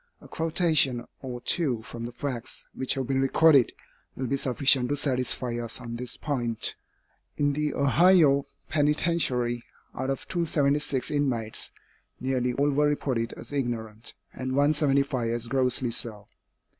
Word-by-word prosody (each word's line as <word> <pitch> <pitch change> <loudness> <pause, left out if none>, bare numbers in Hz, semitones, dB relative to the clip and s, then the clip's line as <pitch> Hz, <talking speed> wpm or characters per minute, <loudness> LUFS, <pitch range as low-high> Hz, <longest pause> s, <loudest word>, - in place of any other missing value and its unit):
A - - -14
quotation 160 -7 +1 0.2
or 125 -2 -6
two 125 -4 0
from 115 0 -7
the - - -8
facts 120 -1 -5
which 130 - 0
have 135 -1 -2
been 135 +1 0
recorded, 140 -1 +5 0.4
will 130 - -3
be 135 - 0
sufficient 135 -1 +3
to 145 - +1
satisfy 125 -3 -1
us 115 +1 -5
on 120 -2 -6
this 120 0 -5
point. 120 -6 -1 0.6
In 145 -1 +2
the 150 0 -1
Ohio 145 0 +5 0.2
penitentiary, 145 -6 +1 0.3
out 130 +1 -3
of 135 - -3
276 145 -5 0
inmates, 125 -7 -1 0.5
nearly 125 -1 0
all 145 +3 +1
were 145 +1 +3
reported 125 -5 -1
as - - -9
ignorant, 115 -4 -4 0.2
and 130 0 -4
175 140 -3 +2
as 120 0 -2
grossly 130 -1 +1
so. 110 -3 -3
135 Hz, 140 wpm, -27 LUFS, 120-145 Hz, 0.6 s, recorded